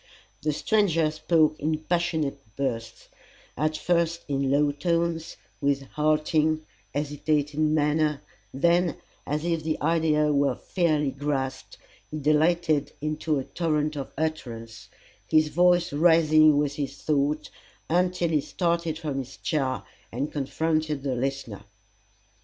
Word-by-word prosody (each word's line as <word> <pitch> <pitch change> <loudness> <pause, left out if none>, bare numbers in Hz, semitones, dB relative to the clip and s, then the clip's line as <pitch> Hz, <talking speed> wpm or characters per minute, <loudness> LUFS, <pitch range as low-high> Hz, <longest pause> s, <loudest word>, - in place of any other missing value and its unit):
The 155 - 0
stranger 165 -3 +2
spoke 155 0 +2
in 155 +1 0
passionate 160 -4 -1
bursts, 120 -5 -4 0.5
at 155 +3 0
first 170 0 0
in 140 -2 0
low 145 +1 +3
tones, 165 +1 -1 0.2
with 140 -1 +1
halting, 155 +1 +1 0.3
hesitating 150 +1 0
manner, 150 0 +1 0.3
then, 170 +4 +2 0.3
as 150 +2 -2
if 165 -2 0
the 155 0 -2
idea 150 -1 +2
were 140 0 +2
fairly 155 -6 0
grasped, 135 -2 -3 0.3
he 155 - -5
dilated 155 0 +2
into 155 0 -1
a 135 - -2
torrent 155 -1 -1
of 140 -2 -5
utterance, 120 -8 -4 0.4
his 155 -1 +4
voice 175 0 +3
rising 155 -1 +5
with 145 -1 0
his 140 -2 -4
thought, 150 0 0 0.4
until 180 0 +1
he 155 -3 +2
started 170 -1 -1
from 150 -4 -3
his 130 -1 -7
chair 135 -5 -1 0.3
and 135 +6 -3
confronted 155 0 -1
the 135 -2 -1
listener. 130 -4 -3
155 Hz, 125 wpm, -26 LUFS, 145-160 Hz, 0.5 s, rising